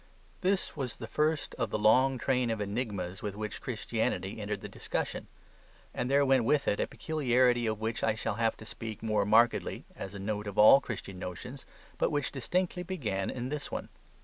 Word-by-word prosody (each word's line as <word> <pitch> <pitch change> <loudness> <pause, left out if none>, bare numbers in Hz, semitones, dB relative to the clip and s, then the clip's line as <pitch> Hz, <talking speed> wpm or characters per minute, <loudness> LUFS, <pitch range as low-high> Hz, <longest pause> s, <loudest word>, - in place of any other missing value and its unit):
This 190 +1 0
was 130 -5 -3
the - - -7
first 155 0 0
of 115 - 0
the - - -1
long 130 +5 +4
train 125 0 +1
of 110 -1 -1
enigmas 100 -4 -3
with 105 -2 -4
which 105 0 -5
Christianity - - -2
entered - - -3
the - - -6
discussion. - - -3 0.7
And 125 - -2
there 140 +1 +4
went 130 -2 +4
with 140 +5 +2
it 100 - +2
a - - +1
peculiarity 125 -6 +2
of 110 -1 -1
which 110 +1 -2
I 110 - +2
shall 110 0 -2
have 115 -1 +2
to 110 - -11
speak 110 -1 -7
more 105 -2 +1
markedly, 115 +3 +3
as 95 +1 -7
a - - -6
note 105 +1 -3
of 100 - -6
all 110 +6 +9
Christian 100 -7 -6
notions, 125 +10 -7 0.3
but - - +3
which 145 -2 0
distinctly 180 +7 -1
began 120 - -2
in 125 0 -4
this 150 0 -4
one. - - -4
115 Hz, 195 wpm, -31 LUFS, 105-135 Hz, 0.7 s, all